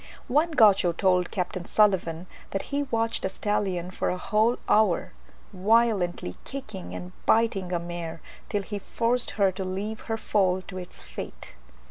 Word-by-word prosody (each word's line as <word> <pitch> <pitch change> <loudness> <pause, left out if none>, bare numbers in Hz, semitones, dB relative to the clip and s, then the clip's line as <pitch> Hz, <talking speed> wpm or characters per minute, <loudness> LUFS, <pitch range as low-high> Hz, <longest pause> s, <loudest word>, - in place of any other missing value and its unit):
One 300 +7 +3
Gaucho 200 - +5
told 180 0 +2
Capt. 180 +1 -2
Sulivan 185 -5 +2 0.2
that 195 - -2
he 285 - +2
had 285 -2 -3
watched 230 0 0
a 190 - +1
stallion 190 -3 -1
for - - -1
a 180 - -1
whole 220 +6 +2
hour, 210 -5 +3 0.4
violently 195 - +2
kicking 235 -9 -7
and 180 0 -7 0.2
biting 205 -5 +3
a 175 - +1
mare 170 -1 -5 0.3
till 205 -1 -1
he 205 0 -5
forced 235 +4 0
her 195 -2 +4
to 190 +1 -5
leave 200 +4 -3
her 225 - 0
foal 190 -4 +1
to 185 +1 -7
its 180 - -9
fate. - - -8
195 Hz, 160 wpm, -27 LUFS, 180-220 Hz, 0.4 s, Gaucho